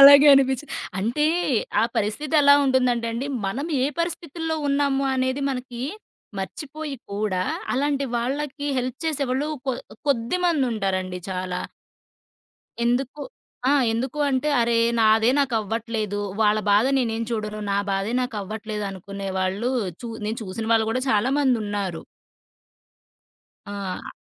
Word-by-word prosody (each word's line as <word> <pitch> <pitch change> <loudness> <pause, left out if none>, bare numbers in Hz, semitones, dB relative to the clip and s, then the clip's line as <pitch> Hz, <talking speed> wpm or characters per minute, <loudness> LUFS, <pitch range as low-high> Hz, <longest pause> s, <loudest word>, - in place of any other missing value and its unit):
అలాగే 280 +1 +10
అనిపిచ్చి 265 +1 +2 0.3
అంటే, 235 +10 +1 0.6
ఆ - - +4
పరిస్థితి 220 +9 -1
ఎలా 285 0 +8
ఉంటుందంటేండి, 245 -2 +1 0.2
మనం 260 +10 -2 0.2
ఏ - - +3
పరిస్థితుల్లో 330 -1 -2
ఉన్నాము 280 -1 +2
అనేది 260 +1 0
మనకి, 250 -2 -5 0.6
మర్చిపోయి 295 - -5 0.2
కూడా 200 -3 0 0.3
అలాంటి 280 +1 +1
వాళ్ళకి 285 +4 -2
హెల్ప్ 255 0 -3
చేసేవాళ్ళు 285 -2 0 0.2
కొ 265 - +2 0.4
కొద్దిమందుంటారండి 230 - 0
చాలా. 185 -1 -3 1.2
ఎందుకు 260 +4 0 0.5
ఆ! - - +5 0.2
ఎందుకు 250 +5 -2
అంటే, 265 +2 +1
అరే! 235 0 +2 0.2
నాదే 220 0 +5
నాకవ్వట్లేదు, 225 -4 -1 0.2
వాళ్ళ 215 0 +4
బాధ 205 +3 +5
నేనేం 230 -3 0
చూడను. 215 -2 -3
నా 200 - +2
బాధే 195 +3 -1
నాకవ్వట్లేదు, 215 -2 -4
అనుకునే 195 +1 -6
వాళ్ళు 190 +5 0 0.3
చూ 240 - -6 0.2
నేను 220 +2 -2
చూసిన 205 +2 -5
వాళ్ళు 225 -1 +3
కూడా, 255 - 0
చాలామందున్నారు. 210 - +1 1.6
ఆ! 200 -2 -5
235 Hz, 110 wpm, -24 LUFS, 210-275 Hz, 1.6 s, అలాగే